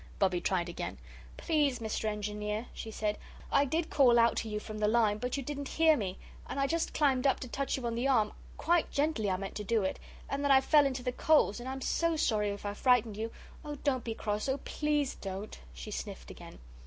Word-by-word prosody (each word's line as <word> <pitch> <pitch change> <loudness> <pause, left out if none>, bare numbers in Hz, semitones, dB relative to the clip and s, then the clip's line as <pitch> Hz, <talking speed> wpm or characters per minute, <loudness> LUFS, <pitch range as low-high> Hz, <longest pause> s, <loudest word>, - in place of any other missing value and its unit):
Bobbie 185 -3 +2
tried 180 -2 0
again. 175 - -5 0.4
"Please, 295 -6 +1
Mr. 220 -1 -3
Engineer," 210 +1 -2
she 225 - -7
said, 210 -1 -2 0.3
"I 280 - +4
did 320 +4 -1
call 250 -4 +5
out 235 0 +5
to 225 - -2
you 210 0 -2
from 215 0 -7
the 210 - +2
line, 215 -2 +3
but 250 +3 -2
you 275 - -3
didn't 285 +1 -4
hear 320 -1 +4
me 195 -7 -3 0.3
and - - -3
I 275 - +3
just 330 +3 0
climbed 275 -3 +3
up 270 - +2
to 255 - -5
touch 275 +3 -2
you 255 - -5
on 235 - -1
the 240 +3 0
arm 220 -6 +3 0.2
quite 345 +1 +2
gently 280 -8 0
I 185 - +1
meant 195 +1 -5
to 210 - -4
do 220 0 +1
it 190 - -2 0.3
and 275 +1 -2
then 285 - +1
I 270 -1 +8
fell 290 +1 +5
into 260 -2 -4
the 250 - 0
coals 270 -5 +3
and 245 +2 -6
I - - -3
am 270 - -6
so 335 +4 +1
sorry 215 -8 +1
if 200 0 -6
I 205 - -2
frightened 235 -2 +3
you. 225 +2 -4 0.3
Oh, 295 -1 -5
don't 260 -4 +1
be 225 -1 -4
cross 210 +4 -2
oh, 265 - +1
please 295 -2 0
don't!" 195 +2 -7
She - - -8
sniffed - - -6
again. - - -11
235 Hz, 235 wpm, -31 LUFS, 210-280 Hz, 0.4 s, I